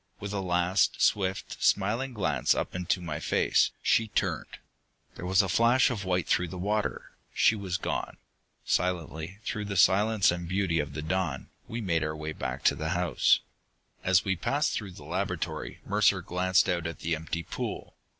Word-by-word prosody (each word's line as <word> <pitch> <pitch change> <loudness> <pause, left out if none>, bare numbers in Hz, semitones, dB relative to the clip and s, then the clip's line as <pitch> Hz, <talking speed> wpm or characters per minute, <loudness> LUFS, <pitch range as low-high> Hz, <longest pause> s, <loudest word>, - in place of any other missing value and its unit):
With 100 0 -5
a 100 - -1
last 90 +1 +1
swift, 95 -1 0
smiling 115 +7 +2
glance 75 - +1
up - - -3
into 90 0 -1
my 80 -2 -4
face, - - +2
she 115 - +3
turned. - - -2 0.6
There 90 - -7
was 95 +2 +4
a - - -2
flash 115 +8 +4
of 105 -6 -4
white 90 -2 0
through 90 - +2
the 90 - -7
water. 105 +3 -2 0.2
She 115 - +4
was 95 -4 -3
gone.... - - -3 0.5
Silently, 85 0 -1
through 105 -1 -3
the 100 -1 -3
silence 100 +3 +4
and 85 -1 -4
beauty 95 -3 +1
of 75 -1 -3
the 75 +1 -5
dawn, 80 -6 -2 0.2
we 115 0 -4
made 85 -6 0
our 75 0 -2
way 75 0 -5
back - - -5
to - - +4
the 80 0 -3
house. 90 -1 +3 0.6
As 95 +1 +3
we 95 -1 +1
passed 140 - 0
through 100 -4 -4
the - - -12
laboratory, - - -3
Mercer - - +2
glanced 90 +1 +2
out 85 -3 0
at 85 - -7
the 85 - -1
empty 80 +2 -4
pool. - - -5
90 Hz, 180 wpm, -28 LUFS, 85-100 Hz, 0.6 s, was